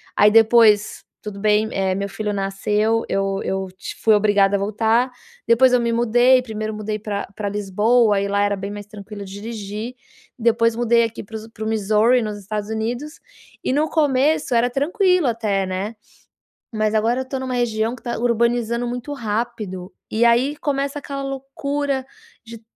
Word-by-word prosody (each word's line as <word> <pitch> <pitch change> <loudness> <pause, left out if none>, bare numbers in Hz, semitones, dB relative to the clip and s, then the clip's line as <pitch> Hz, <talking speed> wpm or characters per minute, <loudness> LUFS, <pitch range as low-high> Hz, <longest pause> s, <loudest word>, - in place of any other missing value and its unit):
Aí 210 0 +5
depois, 220 -1 +4 0.2
tudo 205 -2 -7
bem, 215 +1 +2
eh, 190 -1 0
meu 200 +1 -2
filho 210 +1 -3
nasceu, 210 +3 0
eu 195 0 -1
eu 190 0 -2
t - - -7
fui 220 - +5
obrigada 205 -1 +3
a - - -4
voltar. 225 +5 +1 0.4
Depois 250 +2 +5
eu 250 - +5
me 235 0 0
mudei, 240 +2 +4
1º 215 -2 -5
mudei 215 0 -3
pra 205 -1 -4
pra 205 -1 -3
Lisboa, 210 +2 +2
e 200 - -1
lá 200 0 +1
era 205 0 +1
bem 200 +1 -6
mais 205 -1 -7
tranquilo 205 -1 -9
dirigir. 210 +3 -6 0.4
Depois 230 0 +2
mudei 235 0 +3
aqui 225 -1 -4
para 220 +2 -11
os 220 +1 -10
para 220 -1 -9
o - - -2
Missouri, 220 +3 +3
nos 210 -1 -4
Estados 205 +1 -5
Unidos, 240 +8 -4 0.4
e - - 0
no 305 +2 +1
começo 290 -2 +1
era 240 +1 +3
tranquilo 360 - +1
até, 210 -4 0
né? 190 +4 -4 0.8
Mas 215 0 0
agora 235 +4 +1
eu - - -6
tô 265 - -3
numa 260 -1 -4
região 230 -1 0
que - - -17
tá 240 -1 -3
urbanizando 235 0 +1
muito 245 +4 -5
rápido. 215 -6 -4 0.2
E 230 +2 +2
aí 250 +5 +3
começa 280 0 -2
aquela 275 -1 -6
loucura 275 0 -3 0.4
de 230 0 -10
225 Hz, 175 wpm, -21 LUFS, 210-245 Hz, 0.8 s, Aí